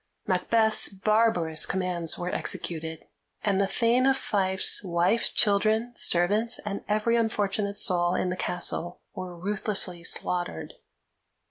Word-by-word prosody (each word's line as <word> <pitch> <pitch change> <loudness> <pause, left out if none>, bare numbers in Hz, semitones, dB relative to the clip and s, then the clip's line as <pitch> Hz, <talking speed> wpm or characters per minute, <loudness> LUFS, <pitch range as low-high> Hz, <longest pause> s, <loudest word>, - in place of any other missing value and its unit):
Macbeth's 220 +4 +2
barbarous 200 -5 +1
commands 180 -3 -1
were 180 +1 -4
executed, 160 -1 -3 0.4
and 200 -2 +1
the 195 - +1
Thane 235 +5 +1
of 270 0 +3
Fife's 190 -4 +1
wife, 180 +5 0
children, 220 +3 +1
servants, 210 +8 +2
and 200 -1 -5
every 215 +3 +1
unfortunate 205 -3 -1
soul 175 -1 +2
in 180 - -1
the 180 - -3
castle, 175 -1 -2
were 180 -1 -8
ruthlessly 190 -2 -1
slaughtered. 175 - -2
195 Hz, 120 wpm, -26 LUFS, 175-215 Hz, 0.4 s, of